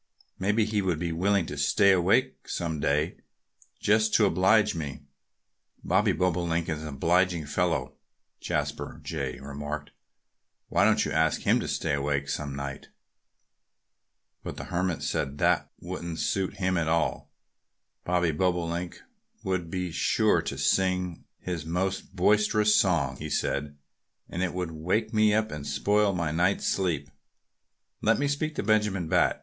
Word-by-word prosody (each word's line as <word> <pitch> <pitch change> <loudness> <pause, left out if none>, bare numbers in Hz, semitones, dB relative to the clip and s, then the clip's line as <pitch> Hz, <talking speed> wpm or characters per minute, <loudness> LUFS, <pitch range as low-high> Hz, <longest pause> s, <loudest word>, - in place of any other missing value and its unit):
Maybe 105 +3 +2
he 105 -1 0
would 90 -4 0
be 85 +1 -2
willing 95 +2 +1
to 75 -2 -6
stay 100 +8 +4
awake 100 +9 +2
some 80 -3 -2
day, 75 +4 0 0.6
just 110 +1 +3
to 110 - +5
oblige 105 +3 +3
me." 75 -5 -5 0.8
"Bobby 100 +4 +3
Bobolink 85 -2 0
is 80 -1 -2
an 80 - -6
obliging 85 +3 +1
fellow," 85 -3 -1 0.5
Jasper - - -3
Jay 70 -5 -4
remarked. 75 +2 -6 0.8
"Why - - +3
don't - - +3
you - - -3
ask 80 +1 +2
him - - +3
to - - -4
stay - - -1
awake 70 0 -1
some 70 -2 -3
night?" 70 0 -6 1.5
But - - -7
the - - -5
Hermit 85 -4 -2
said 70 0 -2
that - - +2
that - - -54 0.2
wouldn't 85 -2 -5
suit 95 +2 -1
him 95 -1 0
at 80 - -1
all. 80 -1 0 0.7
"The 90 -2 +2
Bobolink 85 0 -1
person - - -17 0.4
would 90 -3 -2
be 90 0 -3
sure - - +2
to - - -5
sing 90 -2 0
his 90 -4 -4
most 95 +3 -2
boisterous 105 +2 +3
song," 85 -6 +2
he - - -6
said, 70 +1 -2 0.5
"and 85 - -4
it 90 -2 -1
would 90 -2 -3
wake 95 +8 -1
me 110 -1 +4
up 110 0 0
and 75 -1 -6
spoil 100 +8 +2
my 85 -4 -1
night's 90 +5 +1
sleep. 80 -7 -1 0.9
Let 115 +1 +3
me 145 - 0
speak 150 +2 -2
to - - -2
Benjamin 105 -4 +1
Bat!" - - +2
90 Hz, 155 wpm, -27 LUFS, 80-100 Hz, 1.5 s, to